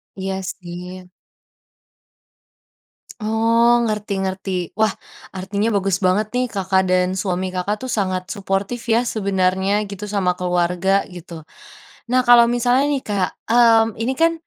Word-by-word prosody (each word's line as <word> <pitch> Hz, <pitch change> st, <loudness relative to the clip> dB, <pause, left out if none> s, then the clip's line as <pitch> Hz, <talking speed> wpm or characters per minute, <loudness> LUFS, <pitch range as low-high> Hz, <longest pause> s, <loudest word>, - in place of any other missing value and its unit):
Iya, 190 Hz, 0 st, -4 dB
sih. 180 Hz, 0 st, -8 dB, 2.1 s
Oh 230 Hz, +2 st, +3 dB
ngerti-ngerti. 195 Hz, -4 st, -3 dB
Wah 215 Hz, -2 st, +3 dB, 0.4 s
artinya 200 Hz, +3 st, -2 dB
bagus 195 Hz, -2 st, +1 dB
banget 190 Hz, +3 st, +1 dB
nih 250 Hz, +1 st, 0 dB
Kakak 190 Hz, -3 st, 0 dB
dan 180 Hz, 0 st, +2 dB
suami 185 Hz, -1 st, -2 dB
Kakak 185 Hz, +3 st, -2 dB
itu -, -, -4 dB
sangat 185 Hz, -2 st, -2 dB
suportif 200 Hz, +4 st, -3 dB
ya 230 Hz, +1 st, +3 dB
sebenarnya 195 Hz, -2 st, 0 dB
gitu 200 Hz, +1 st, -7 dB
sama 195 Hz, -3 st, 0 dB
keluarga 180 Hz, +2 st, +1 dB
gitu. 170 Hz, -2 st, -10 dB, 0.6 s
Nah 255 Hz, +2 st, +3 dB
kalau 240 Hz, -1 st, +7 dB
misalnya 245 Hz, +2 st, +2 dB
nih 285 Hz, -2 st, -1 dB
Kak, 200 Hz, -3 st, -1 dB, 0.2 s
mmm, 230 Hz, -1 st, +6 dB
ini 235 Hz, +3 st, -1 dB
kan, 330 Hz, +3 st, +3 dB
195 Hz, 125 wpm, -20 LUFS, 185-225 Hz, 2.1 s, kalau